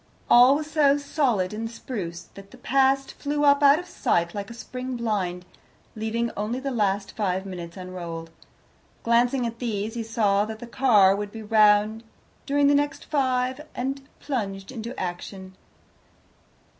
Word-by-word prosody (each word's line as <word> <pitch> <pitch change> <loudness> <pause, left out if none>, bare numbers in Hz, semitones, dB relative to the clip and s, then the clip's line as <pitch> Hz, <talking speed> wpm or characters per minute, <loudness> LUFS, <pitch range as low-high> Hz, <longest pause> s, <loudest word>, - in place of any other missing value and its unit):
All 250 +3 +8
was 305 +1 -4
so 290 -3 +4
solid 255 - 0
and 225 +1 -4
spruce, 190 -8 -6
that 195 0 -12
the 255 - -15
past 270 +1 +1
flew 290 0 -1
up 285 0 +5
out 285 +1 +7
of 355 - -6
sight 170 - 0
like 200 -1 -5
a - - -8
spring 255 +2 -6
blind, 190 -6 -2 0.5
leaving 225 +2 -2
only 215 +5 -2
the 275 +1 -3
last 200 -4 -1
five 190 -3 -1
minutes 175 -3 -7
unrolled. 170 -3 -7 0.7
Glancing 240 +2 +2
at 230 0 -5
these, 220 -3 -3
he 235 - -3
saw 215 -3 +1
that 220 0 -6
the 240 - -9
car 225 -6 +4
would 205 0 -4
be 225 0 -8
round 215 0 +4 0.4
during 285 +1 +2
the 285 - +5
next 285 0 0
five, 260 -2 0
and 270 +2 -3 0.2
plunged 200 -8 -4
into 235 0 -6
action. 185 +1 -6
225 Hz, 155 wpm, -25 LUFS, 200-265 Hz, 0.7 s, All